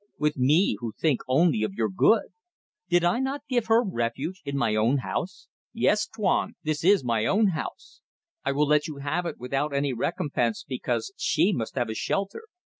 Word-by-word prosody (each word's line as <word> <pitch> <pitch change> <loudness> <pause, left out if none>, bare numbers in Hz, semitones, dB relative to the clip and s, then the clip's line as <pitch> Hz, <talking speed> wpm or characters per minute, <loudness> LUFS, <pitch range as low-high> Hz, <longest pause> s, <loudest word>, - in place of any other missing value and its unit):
With 150 0 0
me 140 - +3
who 115 -2 -5
think 150 -6 +1
only 135 -2 +3
of 110 -3 -1
your 110 0 +1
good? 140 - +3 0.6
Did 175 -1 +3
I 175 +8 +2
not 270 +2 -2
give 240 -4 0
her 230 +2 +4
refuge, 155 - -3
in 140 -1 -3
my 115 -5 +1
own 115 +6 +3
house? 185 - -4 0.3
Yes, 215 -2 +2
Tuan! 215 -4 0
This 155 -1 -2
is 195 -2 +5
my 115 -3 0
own 210 +1 +3
house. 160 - -6 0.4
I 140 - 0
will 145 +2 +2
let 150 0 +2
you 155 -3 -7
have 155 +5 -2
it - - -5
without 135 +4 -2
any 140 -1 0
recompense 120 -1 -1
because 125 +3 -3
she 200 - +2
must 115 -8 -4
have 120 -4 -1
a - - -2
shelter. 200 - -3
150 Hz, 190 wpm, -26 LUFS, 125-190 Hz, 0.6 s, is